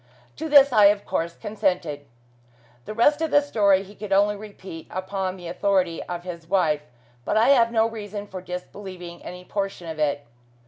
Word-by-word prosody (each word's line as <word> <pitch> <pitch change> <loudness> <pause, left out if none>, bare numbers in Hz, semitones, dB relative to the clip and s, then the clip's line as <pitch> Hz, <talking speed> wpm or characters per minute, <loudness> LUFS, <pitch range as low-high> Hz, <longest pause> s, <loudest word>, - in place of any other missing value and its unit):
To 320 +1 -4
this 280 -2 +7
I, 210 -3 +7
of 200 0 +4
course, 170 +1 -2
consented. 180 -9 -2 0.8
The - - -5
rest 290 +7 +4
of 320 - 0
the 290 - +6
story 205 -9 +2
he 200 +1 -14
could 210 -1 -8
only 205 +2 +4
repeat 195 -5 -10
upon 190 0 -3
the 175 -2 -9
authority 180 -1 0
of 175 -1 -6
his 170 -2 -8
wife, 165 -5 +2 0.4
but - - 0
I 225 +4 +5
have 235 -4 +5
no 225 -1 +3
reason 205 -2 -6
for 190 -2 -8
disbelieving 180 -1 -8
any 180 0 -9
portion 195 -3 -4
of 160 -1 -6
it. 145 -1 0
195 Hz, 180 wpm, -24 LUFS, 175-210 Hz, 0.8 s, this